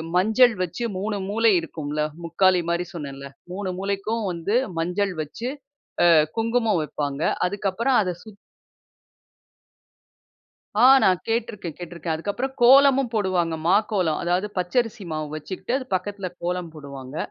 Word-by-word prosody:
மஞ்சள் 220 +6 +5
வச்சு 180 +7 -4 0.2
3 205 +2 -2
மூளை 225 +2 +3
இருக்கும்ல 150 -2 -4 0.2
முக்காலி 180 +2 +3
மாரி 170 +1 0
சொன்னேல 140 -4 -7 0.3
3 190 +1 -4
மூளைக்கும் 200 +3 -2
வந்து 170 +5 -2 0.2
மஞ்சள் 180 +4 0
வச்சு 220 - -5 0.5
அ - - +6 0.3
குங்குமம் 225 -3 +1
வைப்பாங்க. 145 -1 -4 0.2
அதுக்கப்புறம் 205 +7 0
அத 185 -3 -1
சுத் 215 -2 -13 2.4
ஆ 245 +4 +7 0.2
நான் 185 -2 +4
கேட்டுருக்கேன், 215 -7 -3
கேட்டுருக்கேன். 170 -1 -4
அதுக்கப்புறம் 205 +11 -3
கோலமும் 270 +1 +6
போடுவாங்க 185 -6 0
மாக்கோலம் 190 -4 +2
அதாவது 180 +4 0
பச்ச 180 -1 -2
அரிசி 225 -2 -9
மாவு 155 -1 -3
வச்சுக்கிட்டு 190 +8 -5
அது 265 - -6
பக்கத்தில 195 +1 -3
கோலம் 175 0 -2
போடுவாங்க. 140 -3 -9
185 Hz, 125 wpm, -24 LUFS, 170-220 Hz, 2.4 s, ஆ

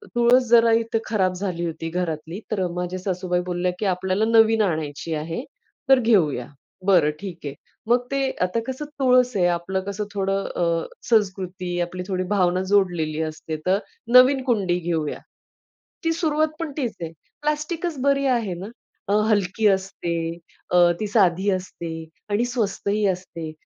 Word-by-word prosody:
तुळस 240 +2 +5
जरा 230 -1 +6
इथे 230 0 -1
खराब 190 -4 +1
झाली 180 -2 -3
होती 165 0 -4
घरातली, 165 +1 -3
तर 195 -4 0
माझ्या 180 +1 -3
सासूबाई 180 -1 -1
बोलल्या 180 0 -1
की - - -1
आपल्याला 190 +2 +1
नवीन 225 -1 +5
आणायची 160 -4 -2
आहे 165 +8 -4 0.5
तर 270 - +7
घेऊया. 170 - +2 0.4
बरं 175 -6 +5
ठीक 190 -4 -7
आहे. 140 - -4 0.3
मग 245 +1 +3
ते 275 -1 +1
आता 180 +5 +1
कसं 260 +3 -4
तुळस 250 -2 +4
आहे, 180 -3 +3
आपलं 175 +2 -1
कसं 200 +1 -3
थोडं 195 0 0
अ, - - 0 0.5
संस्कृती, 185 -5 0
आपली 180 +1 -3
थोडी 185 -2 -1
भावना 185 -2 +2
जोडलेली 170 -6 +1
असते, 155 0 -6
तर 190 +2 +3 0.4
नवीन 260 +1 +7
कुंडी 200 -8 +1
घेऊया. 165 -3 -2 0.8
ती 330 - +2
सुरुवात 310 -2 +1
पण 330 -3 -3
तीच 245 -7 -2
आहे. 165 -1 -4 0.3
प्लास्टिकच 300 +2 -2
बरी 275 0 +2
आहे 210 -6 -3
ना, 190 - -6 0.4
अ, 200 - +1 0.2
हलकी 205 +1 +2
असते, 190 -3 0 0.6
अ, 180 - +4 0.2
ती 215 - -2
साधी 195 -2 +3
असते 180 -3 -4 0.4
आणि 210 +4 +1
स्वस्तही 210 -3 -1
असते. 180 -4 -4
190 Hz, 150 wpm, -23 LUFS, 175-230 Hz, 0.8 s, तर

